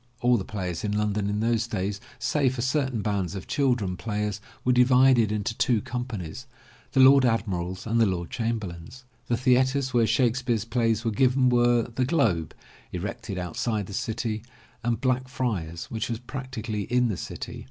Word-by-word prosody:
All 125 0 +4
the 100 - -1
players 90 -5 -4
in 105 -1 -1
London 105 -1 0
in 105 +1 -1
those 115 0 +1
days 100 -2 -3 0.2
save 135 -4 +1
for 120 - -2
certain 130 -4 0
bands 100 -3 -1
of 95 - -6
children 120 -10 0
players 105 +1 -3 0.2
were 125 - +4
divided 125 -2 +5
into 105 +1 -2
two 120 -1 +2
companies, 125 -3 -5 0.5
the 135 - +2
Lord 135 +1 +8
Admiral's 95 -6 -1
and 115 +1 +2
the 110 - +5
Lord 85 -3 -3
Chamberlain's. 110 -1 -4 0.2
The 120 - +1
theatres 130 +1 +2
where 115 -2 +4
Shakespeare's 120 -3 +1
plays 115 -1 0
were 115 - +1
given 130 +3 +3
were 120 -1 +4
The 125 +2 -2
Globe, 115 - +1 0.4
erected 100 +2 -5
outside 100 +4 -2
the 100 - -9
city, 110 0 -2 0.4
and 120 -1 0
BlackfrtafSy 125 - -1
which 110 +1 -2
was 115 - -1
practically 120 -4 -5
in 125 0 +3
the 105 - -1
city. - - -6
115 Hz, 165 wpm, -26 LUFS, 105-125 Hz, 0.5 s, Lord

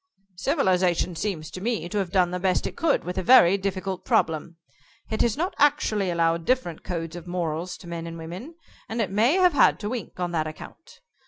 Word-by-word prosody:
"Civilization 185 - +1
seems 160 -3 -3
to 185 - -7
me 225 -4 -1
to 210 +3 -2
have 190 -3 -2
done 180 -2 +3
the 180 - -2
best 185 0 +1
it - - -4
could 325 -3 +1
with 180 +2 -3
a - - -1
very 195 -4 +7
difficult 190 -1 -3
problem. 160 +1 0 0.5
It 220 - 0
has 235 0 +1
not 355 +5 -1
actually 270 -9 +2
allowed 165 -1 +1
different 245 -7 -1
codes 165 -1 -4
of 175 0 -9
morals 175 0 -3
to 175 - -13
men 170 -1 -5
and 165 0 -7
women, 180 - -8 0.3
and 225 - -3
it 205 -5 0
may 220 +8 +3
have 365 -2 +4
had 285 - +4
to 205 - -3
wink 230 -6 -6
on 175 -1 -2
that 160 -2 -1
account. 155 - -11
185 Hz, 210 wpm, -25 LUFS, 170-220 Hz, 0.5 s, very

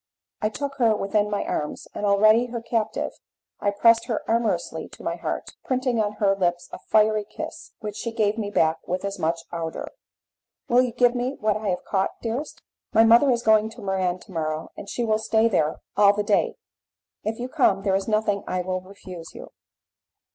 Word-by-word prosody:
I 215 - +2
took 275 +4 -5
her 230 -4 +4
within 205 +1 0
my 205 - -1
arms, 150 - -3
and 205 - -2
already 215 +4 +5
her 235 0 -4
captive, 225 -1 -2 0.5
I 205 - +1
pressed 230 +3 +4
her 225 -4 -2
amorously 230 0 0
to - - -12
my - - -1
heart, - - -4
printing 255 -2 0
on 210 -1 -1
her 200 -2 +2
lips 175 -2 -1
a - - -7
fiery 215 0 +3
kiss, 205 - -8
which 210 -1 -5
she 230 - -3
gave 215 -2 +1
me 215 -3 -3
back 160 -5 +2
with 185 +2 -2
as 200 0 -4
much 165 0 0
ardour. 165 -1 -4 0.8
"Will 245 +1 +5
you 250 -1 0
give 245 +1 +3
me 250 +2 -2
what 215 -1 +1
I 215 0 -3
have 180 - -1
caught, 190 -1 -1
dearest?" 245 +6 -4 0.3
"My 225 - +6
mother 235 +5 +6
is 240 -2 +1
going 220 -1 +4
to 220 - -12
Muran 185 -2 -1
to 200 - -15
morrow, 155 -2 -3
and 200 - -9
she 240 - -2
will 215 -1 +2
stay 220 +1 +2
there 160 -8 0
all 205 -1 +6
the 210 - 0
day; 205 0 +1 0.7
if 220 +1 -2
you 245 - -4
come, 250 -9 +2
there 195 - +1
is 195 0 -1
nothing 215 -2 +1
I 185 0 -1
will 185 0 -2
refuse 185 -3 -11
you." - - -10
210 Hz, 200 wpm, -24 LUFS, 195-230 Hz, 0.8 s, My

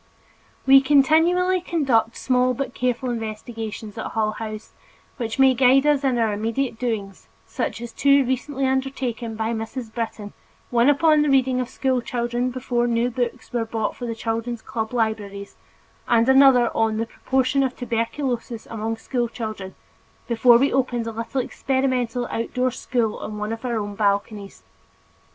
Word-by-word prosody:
We 270 0 +8
continually 325 +7 +3
conduct 265 -10 +1
small 255 -1 +1
but 275 0 -4
careful 250 0 -1
investigations 225 -1 -6
at - - -3
Hull 215 -1 +1
House, 215 0 -7 0.4
which 230 -3 -4
may 265 -1 +6
guide 260 +2 +4
us 295 -2 +3
in 260 -3 +1
our 225 -2 +1
immediate 225 +3 -2
doings 210 -6 -4 0.2
such - - -3
as 235 -1 -7
two 280 -1 +4
recently 265 +2 -2
undertaken 260 -3 -2
by 220 +1 -2
Mrs. 225 +1 -5
Britton, 220 -3 -5 0.4
one 240 +2 +4
upon 305 +1 +4
the 295 - +2
reading 260 -2 +3
of 250 - -4
school 260 -2 0
children 240 +1 -2
before 245 -1 -1
new 235 +1 +1
books 240 -2 -4
were 240 -2 +1
bought 225 -1 -3
for 245 - -6
the 230 - -3
children's 230 +1 -3
club 220 -1 -4
libraries, 215 -4 -3 0.5
and 230 0 +3
another 265 -3 +5
on 225 -1 +1
the 225 - -1
proportion 265 +3 0
of 260 -1 -1
tuberculosis 235 0 -3
among 225 0 -3
school 240 +1 -2
children, 215 -5 -6 0.5
before 235 0 +5
we 275 +4 +2
opened 245 -3 0
a 230 - -3
little 230 +4 -3
experimental 255 -2 -1
outdoor 250 +2 -1
school 235 -3 -1
on 210 0 -6
one 210 +1 -3
of 225 - -8
our 240 -3 -1
balconies. 205 0 -2
240 Hz, 155 wpm, -23 LUFS, 225-260 Hz, 0.5 s, We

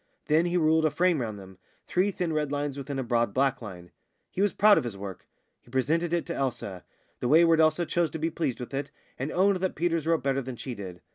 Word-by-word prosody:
Then 160 +3 +3
he 175 +1 +1
ruled 160 -1 +3
a 155 - +4
frame 175 -1 +2
round 110 -3 -4
them 95 -1 -13 0.3
three 185 +3 +1
thin 180 -4 -2
red 150 -2 -1
lines 145 -1 -2
within 140 0 -5
a 135 - -1
broad 115 -3 0
black 135 -1 +1
line. 90 -5 -9 0.4
He 190 - -2
was 205 -1 +3
proud 210 0 +5
of - - -4
his 115 -5 -5
work. 95 -2 -8 0.3
He - - -22
presented 155 +7 0
it 170 -1 0
to 170 - -4
Elsa. 105 -9 -3 0.4
The - - -1
wayward 165 +3 +5
Elsa 155 +2 +3
chose 170 0 0
to - - -5
be 160 +1 -1
pleased 155 -6 -2
with 125 +2 -7
it, 140 +1 -3 0.3
and 135 +4 -3
owned 195 +2 +3
that 185 0 -2
Peters 165 -1 0
wrote 165 -1 +2
better 135 0 +1
than 130 -1 -6
she 125 +2 -6
did. 95 -5 -8
145 Hz, 240 wpm, -27 LUFS, 125-170 Hz, 0.4 s, proud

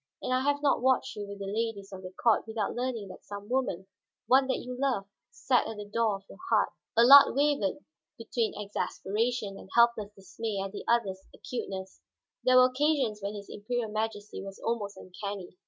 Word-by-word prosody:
And 255 - 0
I 255 - +3
have 285 +1 0
not 280 - +3
watched 260 0 +2
you 205 -1 -5
with 200 0 -7
the 200 - -6
ladies 205 -1 -3
of 190 - -7
the 185 - -7
court 225 +4 +2
without 220 -2 -2
learning 240 -5 -3
that 185 - -11
some 205 0 -8
woman, 245 -7 -1 0.4
one 260 +3 +5
that 260 - +1
you 250 0 -6
loved, 250 -7 0 0.2
sat 250 -2 +1
at 220 -1 -6
the 210 - -6
door 215 0 +1
of 195 - -10
your - - -14
heart." - - +3 0.3
Allard 270 +4 +9
wavered 285 -3 +1 0.3
between 230 -1 -2
exasperation 210 +1 -2
and - - -13
helpless 235 -3 +4
dismay 195 +2 -5
at 195 0 -3
the 205 - -7
other's 200 -5 +1
acuteness; 190 -6 -6 0.4
there 255 0 +5
were 255 - +8
occasions 255 -5 +1
when 200 +1 -4
his 200 -1 -8
Imperial 220 +1 -3
Majesty 215 -1 -3
was 195 0 -8
almost 215 -3 -2
uncanny. 190 0 -7
220 Hz, 190 wpm, -29 LUFS, 200-250 Hz, 0.4 s, Allard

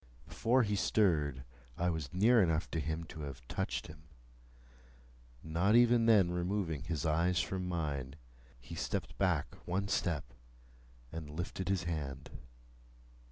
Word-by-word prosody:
Before 125 +3 +2
he 105 -2 0
stirred, 75 -11 +2 0.3
I 90 +1 +1
was 80 -5 -4
near 110 +5 +5
enough 80 -3 +1
to 80 - -1
him 80 +2 -2
to 80 -1 -9
have 70 -4 -7
touched - - -2
him. 75 0 -12 1.4
Not 85 +7 +2
even 120 -1 +5
then 100 -6 +5
removing 90 -4 -1
his 80 -4 -2
eyes 85 +3 +2
from 90 0 -2
mine, 70 -6 -3 0.4
he 70 +6 -11
stepped 80 - -3
back - - +1
one 95 +3 0
step, 80 - -1 0.8
and 80 -2 -6
lifted 90 +4 -4
his 95 -2 +1
hand. 75 -5 -4
85 Hz, 135 wpm, -34 LUFS, 75-95 Hz, 1.4 s, near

